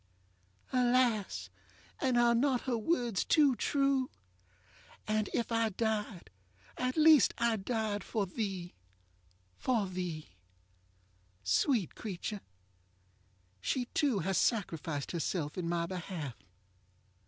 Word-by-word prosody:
ŌĆØ 255 - +3
Alas! 215 - +1 0.5
and 255 -2 +2
are 240 0 +5
not 255 +1 +2
her 255 -2 -1
words 235 - 0
too 290 -5 +4
true? 275 +2 +1 1.0
ŌĆ£And 215 -1 0
if 235 - -1
I 225 -1 +2
died, 210 - -2 0.4
at 255 +2 -2
least 310 -2 +6
I 235 -1 +2
died 215 0 -2
For 210 -3 -1
theeŌĆöfor 180 - -15
thee. 190 -6 -3 0.9
ŌĆØ 185 -9 -1 1.2
Sweet 195 - +2
creature! 205 0 -5 1.2
she 250 - -1
too 280 -8 +2
has 195 -1 +2
sacrificed 165 - -1
herself 165 -3 -2
in 175 -2 -2
my 170 -1 0
behalf. 170 -6 -5
215 Hz, 110 wpm, -32 LUFS, 180-245 Hz, 1.2 s, least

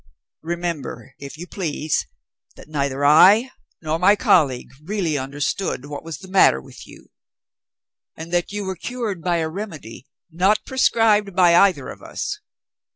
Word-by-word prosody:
Remember, 170 -5 -5
if 140 +2 -9
you 175 - -7
please, 160 -5 -2 0.5
that - - -14
neither 140 -2 -2
I 200 - +6 0.3
nor 160 +1 -1
my 200 +4 +5
colleague 165 - +2
really 180 -3 -2
understood 140 +2 -3
what 145 0 -7
was 165 -3 -7
the 190 - -13
matter 185 - +4
with - - -14
you; - - -16 1.1
and 165 +2 -9
that 175 +2 0
you 205 0 -4
were 190 0 -3
cured 220 -2 -5
by 175 0 0
a 160 -1 -1
remedy, 160 - -8 0.2
not 190 +6 +1
prescribed 215 -6 +2
by 175 -2 +5
either 175 -8 +3
of - - -10
us. - - -5
170 Hz, 150 wpm, -21 LUFS, 150-200 Hz, 1.1 s, I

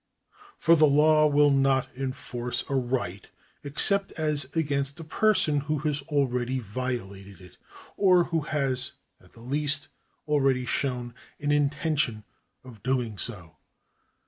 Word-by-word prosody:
For 165 0 +4
the 155 -1 +5
law 155 +2 +4
will 145 0 +4
not 135 -1 +2
enforce 125 -2 -4
a - - -4
right 120 -8 -2 0.3
except 195 +8 +3
as 150 -3 +1
against 140 -2 -1
a - - -7
person 160 -3 +2
who 150 +2 -2
has 145 -1 -1
already 130 -3 0
violated 105 -5 -5
it, 90 -5 -16 0.4
or 185 -3 +5
who 165 -1 -1
has 135 -3 -2 0.3
at - - -22
the 115 - -16
least 145 +3 0 0.4
already 135 -4 +2
shown 125 -2 -2 0.3
an 145 0 -1
intention 145 -5 0 0.4
of 120 -5 -13
doing 120 -4 -2
so. 85 -10 -6
140 Hz, 130 wpm, -26 LUFS, 125-150 Hz, 0.4 s, the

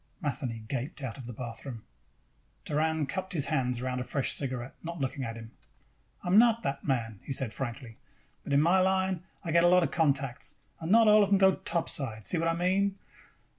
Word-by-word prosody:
Matheny 130 - -3
gaped 135 +3 -4
out 130 +1 -4
of 125 - -8
the - - -5
bathroom. 120 0 -6 0.8
Doran 155 0 0
cupped 185 +6 -4
his 150 -5 +1
hands 125 -6 0
around 125 0 -2
a - - -2
fresh 135 +1 0
cigarette, 130 -2 -4
not 170 +1 -6
looking 135 0 -2
at 115 -2 -4
him. 115 0 -10 0.7
"I - - -6
am 195 +4 +7
not 230 -1 +4
that 140 0 -2
man," 115 -7 -1
he - - -7
said 130 -4 0
frankly. 120 -3 -6 0.5
"But - - -6
in 140 +2 +5
my 180 +3 +4
line 190 -1 +1 0.2
I 165 - -2
get 170 +1 +4
a - - +6
lot 180 0 +5
of - - -1
contacts, 140 -6 0 0.2
and 165 +2 -3
not 225 0 +6
all 210 0 +7
of 200 - +2
them 200 - +5
go 190 0 +5
topside. 135 - -2
See 175 - +3
what 165 - +1
I 165 - +1
mean? 190 +3 +1
145 Hz, 210 wpm, -29 LUFS, 125-180 Hz, 0.8 s, am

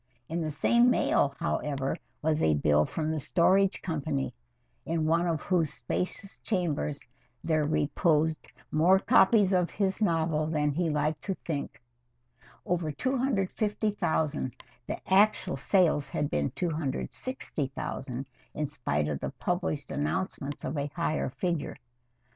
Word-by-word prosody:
In 165 +2 -2
the 155 - -1
same 235 +11 +4
mail, 140 - +2
however, 135 -2 -1 0.3
was 155 0 +1
a 80 - +4
bill 75 +1 +3
from 155 -1 -2
the 160 - -1
Storage 185 +8 +3
Company, 150 -5 -2 0.5
in 160 -1 -1
one 165 +2 +2
of 165 -2 -1
whose 170 -5 +1
spacious 195 +2 -4
chambers 160 -7 -1 0.4
there 155 -2 +2
reposed 155 +1 +1 0.2
more 175 +5 +5
copies 195 0 +5
of 180 -2 +2
his 195 0 -1
novel 160 -5 +1
than 150 -2 +1
he 165 +3 0
liked 150 0 0
to 195 - -1
think 145 -4 -4 0.6
of - - -23 0.2
over 170 -3 0
250,000 205 - 0 0.3
the - - -3
actual 195 -2 +4
sales 155 0 +2
had 145 - -2
been 70 -1 +1
260,000 145 - -3 0.3
in 150 - -1
spite 75 - -1
of 75 -2 -2
the 70 - -3
published 175 -5 -2
announcements 145 -2 -2
of 150 - -3
a 140 - -1
higher 170 -5 0
figure. 170 +2 -2
160 Hz, 130 wpm, -29 LUFS, 145-185 Hz, 0.6 s, more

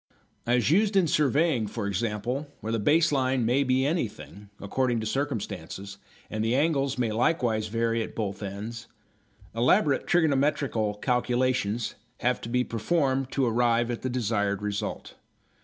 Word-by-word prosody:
As 125 +3 +2
used 205 +4 +3
in 190 -3 +5
surveying, 145 -5 +2
for 105 0 -4
example, 115 +8 -2
where 110 - -4
the 115 - 0
base 155 +8 +3
line 130 -3 +1
may 130 +5 +3
be 130 0 +2
anything, 105 - -3
according 120 +3 0
to - - -4
circumstances, 110 -6 -4 0.3
and 110 0 -3
the 115 +2 +1
angles 140 -2 +1
may 120 -3 0
likewise 115 -2 +1
vary 115 +1 0
at - - -6
both 105 -2 -3
ends, 105 +4 -6 0.7
elaborate 135 - +2
trigonometrical 140 -9 +1
calculations 125 -1 0 0.3
have 125 0 +1
to 115 - -6
be 125 +1 +2
performed 130 +3 0
to 135 - +2
arrive 120 0 +2
at 120 - -4
the 130 - -2
desired 105 -4 -1
result. 105 -1 -4
120 Hz, 145 wpm, -27 LUFS, 110-135 Hz, 0.7 s, in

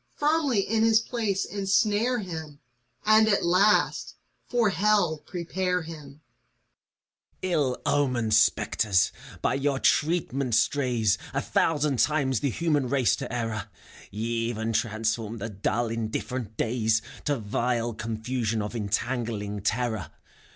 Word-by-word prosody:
Firmly 290 -7 +2
in 220 +3 0
his 225 0 +5
place 220 -4 -1
insnare 210 +4 +1
him 160 -6 -7 0.5
And, 215 +1 +6
at 205 -4 +2
last, 190 +5 +2 0.3
for 235 -5 +2
Hell 190 -4 +2
prepare 180 0 -2
him 160 -2 -9
I 140 +1 -14
FAUST. 120 -5 -43
Ill 140 -7 0
omened 130 -6 +1
spectres! 100 -3 +3 0.3
By - - +2
your 140 0 0
treatment 140 -6 +1
strays 115 -3 +2 0.2
A 140 - +1
thousand 150 -5 +1
times 135 -4 +2
the 140 - 0
human 145 -2 0
race 130 -3 +2
to - - -6
error: 115 -4 -3 0.4
Ye 110 +3 -4 0.2
even 115 -1 -2
transform 110 0 -1
the 115 +2 -5
dull, 110 +3 -1
indifferent 115 0 -4
days 110 -1 +1 0.2
To 145 -2 +1
vile 120 +2 -1
confusion 110 0 -2
of 105 +3 -6
entangling 105 -1 -2
terror. 110 -5 -1
130 Hz, 125 wpm, -26 LUFS, 110-175 Hz, 0.5 s, And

